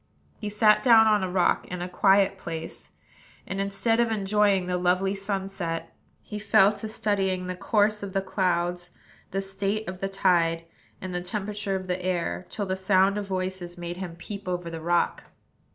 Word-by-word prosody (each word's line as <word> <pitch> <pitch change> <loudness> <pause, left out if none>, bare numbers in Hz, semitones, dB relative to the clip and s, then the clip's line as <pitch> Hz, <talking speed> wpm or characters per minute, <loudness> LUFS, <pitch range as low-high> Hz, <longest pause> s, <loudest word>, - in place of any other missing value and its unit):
He 210 - -4
sat 210 +1 +4
down 230 -4 +7
on 210 -2 +4
a 185 - -1
rock 180 -1 +1
in 180 - -5
a - - -3
quiet 195 +1 +3
place; 165 -2 -7 0.6
and, 195 +1 -3
instead 200 +4 0
of 235 -1 +3
enjoying 205 -2 +2
the 180 0 -1
lovely 185 +2 +2
sunset, 195 -4 -4 0.3
he 210 - -6
fell 205 -1 +5
to 215 +1 -6
studying 195 -4 -1
the 185 0 -4
course 210 +2 +1
of 200 -2 -6
the 195 - +1
clouds, 175 -2 -1 0.4
the 195 - -2
state 195 +2 -2
of 185 0 -6
the 195 - -2
tide, 165 -3 +2 0.4
and 185 -1 -5
the 180 - -2
temperature 205 +1 -3
of 185 0 -4
the 180 0 -3
air, 180 0 -2
till 205 - -3
the 185 0 -1
sound 190 +1 +3
of 200 - -5
voices 185 -2 -4
made 175 0 -5
him 180 -3 -6
peep 200 +3 -8
over 175 -2 -3
the 165 -1 -6
rock. 175 +1 0
190 Hz, 185 wpm, -26 LUFS, 180-205 Hz, 0.6 s, down